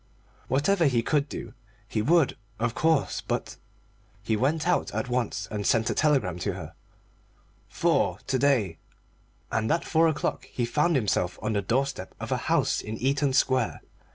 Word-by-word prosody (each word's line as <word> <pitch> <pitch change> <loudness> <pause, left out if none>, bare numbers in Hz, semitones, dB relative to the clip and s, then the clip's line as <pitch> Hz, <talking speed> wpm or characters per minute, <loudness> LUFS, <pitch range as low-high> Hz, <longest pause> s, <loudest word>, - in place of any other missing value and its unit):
Whatever 165 +6 +2
he 120 -4 +2
could 145 +1 +1
do - - -7 0.3
he 110 -1 -1
would, 160 +4 +3 0.2
of 115 0 -1
course, 160 -1 +1
but - - -3 0.7
He 110 - 0
went 150 +8 0
out 180 - +1
at 110 +4 -2
once 115 -4 -1
and 105 -1 -3
sent 110 +2 +2
a - - 0
telegram 130 - +1
to - - -1
her. - - -8 1.0
"Four - - +1
to 130 - 0
day." 120 -11 +2 0.7
And 110 0 0
at 165 - +1
four 165 0 +3
o'clock 155 - -1
he 120 - -2
found 150 +7 +1
himself 100 -7 0
on 110 - 0
the 100 - +1
doorstep 125 -1 -2
of - - -6
a - - +2
house - - +2
in 110 +1 -6
Eaton 140 +2 +1
Square. 130 -2 +1
130 Hz, 165 wpm, -27 LUFS, 110-150 Hz, 1.0 s, would